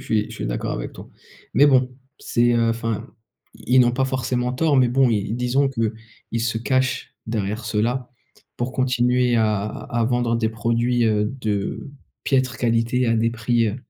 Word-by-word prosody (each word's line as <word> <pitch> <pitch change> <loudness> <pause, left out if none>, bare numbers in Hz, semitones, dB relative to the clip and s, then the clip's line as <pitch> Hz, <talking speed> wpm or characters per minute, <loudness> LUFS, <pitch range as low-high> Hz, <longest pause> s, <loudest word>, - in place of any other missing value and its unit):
je - - -12
suis, 110 -6 +1
je - - -8
suis - - -4
d'accord - - -3
avec - - -5
toi - - -11 0.5
mais 145 - +6
bon 130 -3 +4 0.3
c'est, 120 0 +1
heu, 115 -1 +2
enfin, 115 -1 -3 0.5
i 125 - -2
ils - - +8
n'ont 120 -1 +5
pas 130 +2 +1
forcément 125 -1 -1
tort 150 +2 +2
mais 130 -2 +4
bon 130 +1 +3
ils 105 0 -1
disons 125 +3 +1
qu'ils 115 -2 -4
se 115 -1 -1
cachent 130 +2 -1
derrière 110 0 -3
cela 120 +4 -1 0.5
pour 120 +1 -3
continuer 125 -1 +2
à 110 -3 +1
à 115 +2 -3
vendre 120 -1 +1
des 115 -1 0
produits, 115 +2 0
heu, 105 -2 +2 0.2
de 105 +5 -3 0.3
piètre 130 -2 +1
qualité 120 +1 +1
à 115 - +2
des 115 +1 +2
prix, 115 0 +1
heu 105 - -4
120 Hz, 180 wpm, -22 LUFS, 115-125 Hz, 0.5 s, ils